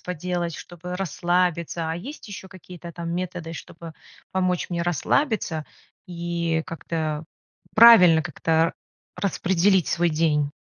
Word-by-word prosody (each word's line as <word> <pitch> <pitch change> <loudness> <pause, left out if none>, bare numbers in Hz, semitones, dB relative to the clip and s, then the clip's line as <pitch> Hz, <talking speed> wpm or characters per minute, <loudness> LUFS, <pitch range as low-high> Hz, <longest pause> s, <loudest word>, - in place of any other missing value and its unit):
поделать, 175 -1 -3
чтобы 175 +2 -8
расслабиться. 175 -3 0
А - - -2
есть 250 - -9
еще 195 -1 -8
какие-то, 180 -2 -11
там, 170 0 -5
методы, 175 -2 -4
чтобы 165 0 -9 0.4
помочь 185 -1 0
мне 170 -1 -1
расслабиться, 175 - 0 0.4
и 170 -2 -2
как-то, 160 -2 -3 0.5
правильно 190 -8 +8
как-то 165 +3 +1 0.4
распределить 190 -1 +2
свой 170 0 +1
день? 150 -2 +1
175 Hz, 115 wpm, -24 LUFS, 165-180 Hz, 0.5 s, правильно